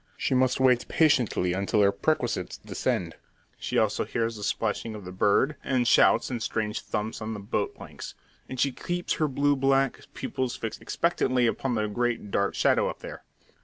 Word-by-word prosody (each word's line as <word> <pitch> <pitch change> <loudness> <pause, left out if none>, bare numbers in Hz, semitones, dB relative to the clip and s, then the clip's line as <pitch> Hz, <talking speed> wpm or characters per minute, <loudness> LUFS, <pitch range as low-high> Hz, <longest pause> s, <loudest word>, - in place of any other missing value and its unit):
She - - 0
must 130 0 +2
wait 125 -2 +3
patiently 125 - +2
until 100 +3 +1
her 100 - +5
perquisites 120 - -1
descend. - - -2 0.4
She - - -2
also - - +2
hears 115 0 -2
the 105 - -9
splashing 110 +2 -2
of 105 -3 -9
the 90 - -7
bird, 105 +10 +2
and 125 -3 +1
shouts - - +4
and 120 -2 -3
strange 110 -1 -2
thumps 110 +2 -4
on 110 +1 -4
the - - -6
boat 100 - -2
planks; - - -9 0.3
and 130 - -6
she 140 - +2
keeps 175 +6 -3
her 155 - +4
blue 145 +1 +2
black 135 -1 +2 0.2
pupils 130 -2 -3
fixed 115 - -5
expectantly 130 -7 +1
upon 125 +2 0
the 110 -1 0
great 115 -1 -2
dark 100 0 0
shadow - - +3
up - - -8
there. - - -8
120 Hz, 180 wpm, -27 LUFS, 105-130 Hz, 0.4 s, her